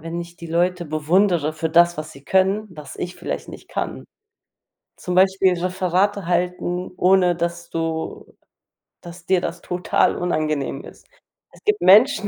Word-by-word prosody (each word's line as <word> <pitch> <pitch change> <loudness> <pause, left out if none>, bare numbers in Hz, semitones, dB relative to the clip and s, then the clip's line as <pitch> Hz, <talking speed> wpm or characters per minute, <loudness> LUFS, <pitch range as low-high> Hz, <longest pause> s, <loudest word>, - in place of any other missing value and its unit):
wenn 165 +2 -5
ich 170 0 -10
die 170 - -9
Leute 175 +1 0
bewundere 160 +1 +1
für 160 +1 -3
das, 175 +1 +4
was 155 0 -6
sie 140 -2 -15
können, 190 +3 +2
was 150 -5 -10
ich 180 0 -5
vielleicht 180 - -5
nicht - - -11
kann, - - -4 0.9
zum 180 - -4
Beispiel 190 0 +4
Referate 185 +2 0
halten, 180 0 -1
ohne 180 -1 +3
dass 170 0 -4
du 165 -1 -4 0.6
dass 175 0 -12
dir 190 -1 +3
das 175 0 -5
total 180 0 0
unangenehm 155 -5 -2
ist. - - -14 0.5
Es - - -19
gibt 425 0 +1
Menschen, 215 +3 +6
175 Hz, 150 wpm, -21 LUFS, 165-185 Hz, 0.9 s, Menschen